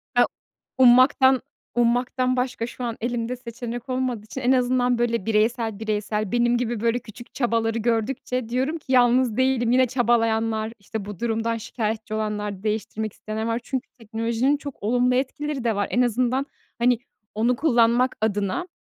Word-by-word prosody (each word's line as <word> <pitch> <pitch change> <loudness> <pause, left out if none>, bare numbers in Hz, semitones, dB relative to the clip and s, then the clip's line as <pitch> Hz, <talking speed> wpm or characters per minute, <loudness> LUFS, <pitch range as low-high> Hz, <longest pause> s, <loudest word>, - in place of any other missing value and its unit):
Ya - - +6 0.5
ummaktan 260 +1 +6 0.3
ummaktan 250 +2 +1
başka 250 -2 -2
şu 245 +1 -8
an 235 -1 -3
elimde 240 +1 -2
seçenek 240 0 -7
olmadığı 255 -4 -2
için 260 +4 -7
en 250 +1 +2
azından 250 -1 +2
böyle 235 -4 0
bireysel, 225 0 +1
bireysel 210 -1 -2
benim 240 0 +2
gibi 240 -2 -2
böyle 235 +2 +1
küçük 240 +1 -13
çabaları 230 -3 0
gördükçe 230 +1 -1
diyorum 265 +6 0
ki 280 - -9
yalnız 245 -2 +4
değilim, 260 -2 +2
yine 255 0 +5
çabalayanlar, 225 -2 +1
işte 200 +1 -6
bu 205 -3 -8
durumdan 230 0 -1
şikâyetçi 220 -1 -4
olanlar, 210 -2 -3
değiştirmek 215 0 -2
isteyenler 220 +1 -5
var. 230 +1 0
Çünkü 260 0 -4
teknolojinin 230 +5 0
çok 285 -7 -9
olumlu 245 +3 +2
etkileri 280 +1 -2
de 230 -3 +1
var. 205 0 0
En 245 - +2
azından 250 +3 +1 0.3
hani 240 -1 +3 0.4
onu 235 +3 +2
kullanmak 245 -3 +3
adına 210 - -1
235 Hz, 155 wpm, -24 LUFS, 220-250 Hz, 0.5 s, Ya